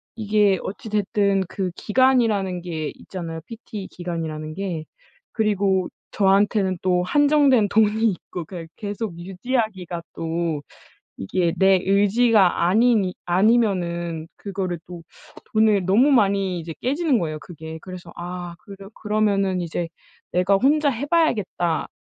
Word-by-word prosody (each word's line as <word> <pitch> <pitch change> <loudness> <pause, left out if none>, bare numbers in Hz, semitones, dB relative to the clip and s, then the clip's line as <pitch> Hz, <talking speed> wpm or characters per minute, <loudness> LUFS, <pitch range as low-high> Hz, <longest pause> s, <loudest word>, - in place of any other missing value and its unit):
이게 210 -3 +2
어찌 220 +3 -6
됐든 200 -1 +1
그 190 -3 -3
기간이라는 215 -7 +2
게 160 -3 -4
있잖아요 165 -3 -7
PT 220 -4 -8
기간이라는 160 -3 -5
게. 175 -4 -4 0.5
그리고 200 -4 +1 0.2
저한테는 195 -1 +2
또 180 -1 +2
한정된 280 -2 +4
돈이 220 +1 +2
있고 175 -1 -7
그냥 170 -2 -8
계속 205 -3 -5
유지하기가 190 -2 -3
또 165 -2 -2 0.6
이게 170 - 0
내 190 -1 +5
의지가 200 -2 +3
아니니 215 -2 +3
아니면은 175 -5 +1
그거를 190 -4 -4
또 175 -2 -9 0.5
돈을 215 -4 +3
너무 230 +10 +4
많이 195 -6 +2
이제 165 0 -7
깨지는 280 -1 +1
거예요 155 -2 -3
그게. 160 -1 -9
그래서 180 -2 -9
'아 175 0 -6
그러 195 -1 -12
그러면은 200 -3 0
이제 170 0 -3 0.4
내가 180 +2 +3
혼자 285 +6 +3
해 265 +2 -3
봐야겠다. 210 - +1
195 Hz, 285 characters per minute, -23 LUFS, 175-215 Hz, 0.6 s, 내